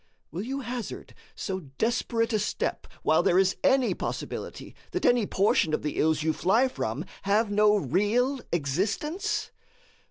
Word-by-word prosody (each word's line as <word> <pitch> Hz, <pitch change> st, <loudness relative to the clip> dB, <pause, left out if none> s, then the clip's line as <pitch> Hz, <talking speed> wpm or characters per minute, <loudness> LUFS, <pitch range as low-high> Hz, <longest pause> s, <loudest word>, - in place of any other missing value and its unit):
Will 170 Hz, +5 st, -4 dB
you 270 Hz, +5 st, -3 dB
hazard 240 Hz, -2 st, -6 dB, 0.2 s
so 190 Hz, -2 st, -3 dB, 0.2 s
desperate 230 Hz, 0 st, 0 dB
a 215 Hz, -, +2 dB
step 210 Hz, -, -2 dB, 0.2 s
while 160 Hz, -, +4 dB
there 180 Hz, -1 st, +3 dB
is 190 Hz, 0 st, +3 dB
any 270 Hz, -2 st, +4 dB
possibility -, -, -5 dB, 0.2 s
that 365 Hz, -, -1 dB
any 240 Hz, -4 st, +4 dB
portion 185 Hz, -5 st, +2 dB
of -, -, -6 dB
the 150 Hz, -, -2 dB
ills 155 Hz, -1 st, +2 dB
you 160 Hz, 0 st, +2 dB
fly 220 Hz, +11 st, +3 dB
from 140 Hz, -, -3 dB, 0.2 s
have 205 Hz, +2 st, +2 dB
no 210 Hz, 0 st, +5 dB
real 210 Hz, -, +1 dB
existence? 195 Hz, -, -1 dB
205 Hz, 150 wpm, -27 LUFS, 175-245 Hz, 0.2 s, no